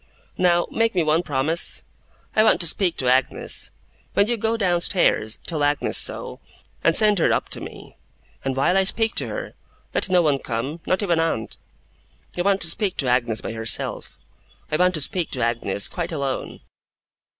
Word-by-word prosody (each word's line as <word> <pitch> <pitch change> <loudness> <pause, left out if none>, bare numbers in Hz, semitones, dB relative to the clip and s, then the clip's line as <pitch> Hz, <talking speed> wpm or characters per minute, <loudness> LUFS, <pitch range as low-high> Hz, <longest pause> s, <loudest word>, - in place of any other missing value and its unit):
Now, 175 -1 +3
make 230 -2 0
me 175 - +2
one 155 +2 +2
promise. 155 +2 0 0.5
I 215 - +5
want 220 - +4
to - - +2
speak 175 +1 0
to 130 - -2
Agnes. 130 +1 +1 0.5
When 200 - +4
you 240 +2 -1
go 225 +1 -1
downstairs, 175 - +1
tell 155 -4 -2
Agnes 145 0 +1
so, - - +1 0.4
and - - +4
send 210 -3 +5
her - - +3
up - - 0
to - - -2
me; - - -11 0.5
and 135 -1 -2
while 140 +7 +2
I 195 - +4
speak 225 +3 +2
to - - +2
her, - - -6 0.4
let - - +1
no 180 -1 +4
one 145 -3 +2
come 130 +8 -4
not 185 +3 +1
even 170 -4 +1
aunt. 160 -9 -1 0.8
I 175 - -1
want 195 +1 +1
to 165 - +2
speak 200 -4 -2
to 135 - -1
Agnes 120 -3 +1
by - - -5
herself. 110 -1 -2 0.5
I 155 - +1
want 180 +1 +3
to 155 - -1
speak 170 +4 -2
to 125 -4 -2
Agnes, 115 -4 -1
quite 175 -1 -4
alone. 140 -4 -4
165 Hz, 185 wpm, -22 LUFS, 135-190 Hz, 0.8 s, I